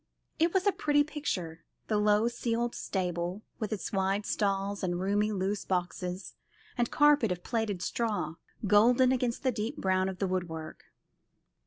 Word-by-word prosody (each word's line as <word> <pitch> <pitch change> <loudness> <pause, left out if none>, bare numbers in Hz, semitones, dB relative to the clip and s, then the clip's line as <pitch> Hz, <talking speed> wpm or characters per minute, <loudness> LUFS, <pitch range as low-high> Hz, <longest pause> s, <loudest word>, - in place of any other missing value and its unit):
It 330 +1 +3
was 380 +1 +1
a 405 - +5
pretty 290 -5 +2
picture, 180 - -4 0.2
the - - -1
old 210 - +1
low 210 +2 +4
ceiled 240 0 -1
stable, 180 +1 -2 0.2
with 215 -1 -3
its 215 -1 -4
wide 195 +1 +1
stalls 200 0 0
and 175 -1 -1
roomy 205 +3 +1
loose 200 0 -1
boxes 180 0 -3 0.4
and 240 -1 +1
carpet 295 -7 +4
of 180 0 -3
plaited 215 -6 -1
straw, 220 -7 -1 0.3
golden 240 +6 +5
against 250 -1 0
the 260 - +3
deep 230 +5 -3
brown 185 -3 +1
of 190 - -6
the 195 - 0
woodwork. 170 -4 -4
205 Hz, 160 wpm, -30 LUFS, 185-235 Hz, 0.4 s, a